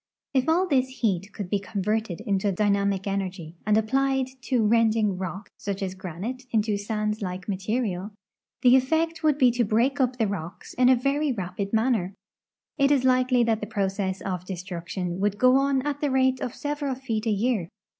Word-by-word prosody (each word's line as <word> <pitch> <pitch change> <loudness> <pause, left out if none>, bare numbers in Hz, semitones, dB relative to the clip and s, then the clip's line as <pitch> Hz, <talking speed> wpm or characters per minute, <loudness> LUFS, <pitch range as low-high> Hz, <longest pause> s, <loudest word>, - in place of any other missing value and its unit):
If 265 +2 +2
all 355 +4 +3
this 260 -4 0
heat 200 -3 0
could 200 -2 -6
be 205 +2 0
con 200 0 -4
verted 210 -4 -1
into 200 0 0
dynamic 200 0 +1
energy 190 -4 -3
and 210 0 +4
applied 265 +3 +1 0.2
to 245 -4 +2
rending 220 -2 +3
rock, 190 +2 -6
such 200 -1 -4
as 185 -1 -3
granite, 190 +8 -6
into 215 -2 +1
sand 210 +1 -2
like 185 -1 -5
material, 200 -1 -2 0.5
the 250 0 +7
effect 320 +5 +1
would 305 -3 +3
be 255 -4 +5
to 240 0 +1
break 240 +6 +1
up 255 -1 +1
the 225 - +2
rocks 180 -4 -6
in 250 0 +4
a 260 - +7
very 275 +4 0
rapid 195 -2 -4
manner. 220 -5 +1 0.6
It 275 0 +4
is 280 -3 +3
likel}'^ 255 -1 +3
that 225 -1 +1
the 210 - -4
pro 200 -3 0
cess 190 -1 -3
of 180 -2 -3
destruction 180 -1 -5
would 205 0 0
go 255 +4 +5
on 275 -1 +2
at 290 0 -3
the 295 - +1
rate 260 -1 +2
of 245 - -4
several 290 -2 -2
feet 230 -4 -3
a - - +3
year. 210 -4 0
220 Hz, 190 wpm, -26 LUFS, 195-260 Hz, 0.6 s, the